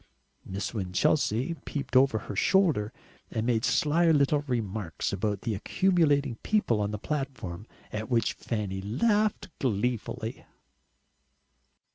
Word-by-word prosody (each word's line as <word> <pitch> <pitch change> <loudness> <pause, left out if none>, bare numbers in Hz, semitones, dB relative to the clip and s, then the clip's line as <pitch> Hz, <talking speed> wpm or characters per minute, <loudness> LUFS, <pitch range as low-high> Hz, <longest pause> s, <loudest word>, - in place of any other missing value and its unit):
Miss 100 +4 -4
Winchelsea 110 - +1
peeped 140 -3 -5
out 130 - +9
over 135 -5 +1
her 105 - -6
shoulder, 150 - +3 0.4
and 110 -2 -2
made 115 -2 +1
sly 165 +3 +3
little 145 -1 +3
remarks 105 -9 -2
about 100 0 -1
the 115 - -2
accumulating 145 - +2
people 165 - +1
on 100 - 0
the 105 - -3
platform, 115 - -4 0.3
at 110 +2 -4
which 115 -3 +2
Fanny 100 -4 -3
laughed 205 - +1
gleefully. 120 0 -2
115 Hz, 120 wpm, -28 LUFS, 105-145 Hz, 0.4 s, out